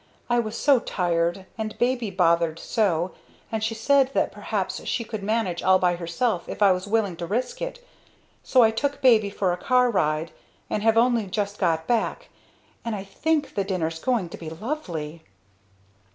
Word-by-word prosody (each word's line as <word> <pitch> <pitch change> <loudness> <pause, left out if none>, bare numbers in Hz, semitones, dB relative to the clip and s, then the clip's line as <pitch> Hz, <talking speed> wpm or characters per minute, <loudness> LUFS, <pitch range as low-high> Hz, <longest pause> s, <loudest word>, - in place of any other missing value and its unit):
I 240 - +4
was 225 0 -3
so 280 -3 +4
tired, 175 -1 -1
and 215 0 -4
baby 245 -2 0
bothered 170 -3 +2
so, 180 -3 0 0.4
and 220 -1 -2
she 225 +1 -1
said 270 +4 +3
that - - +2
perhaps - - -3
she 235 - -1
could 220 -2 -6
manage 200 -4 -1
all 190 0 +5
by 180 -1 +2
herself 175 +4 -2
if - - -1
I 200 - +7
was 185 +1 -1
willing 205 -4 +1
to 170 -1 -5
risk 250 - -2
it, - - -5 0.6
so 255 -2 +4
I 220 - +5
took 280 +5 -2
baby 220 -5 +5
for 190 -2 0
a - - -3
car 250 +5 +3
ride 155 -4 0 0.4
and 210 - 0
have 225 +1 +3
only 235 -3 +3
just 205 +1 -3
got 165 -4 +1
back. 245 - -1 0.5
And 230 -2 -2
I 195 - -5
think 300 +9 -1
the 200 - 0
dinner's 165 -4 -2
going 225 -5 0
to - - -8
be 160 - -6
lovely!" 165 - -5
205 Hz, 180 wpm, -25 LUFS, 175-235 Hz, 0.6 s, I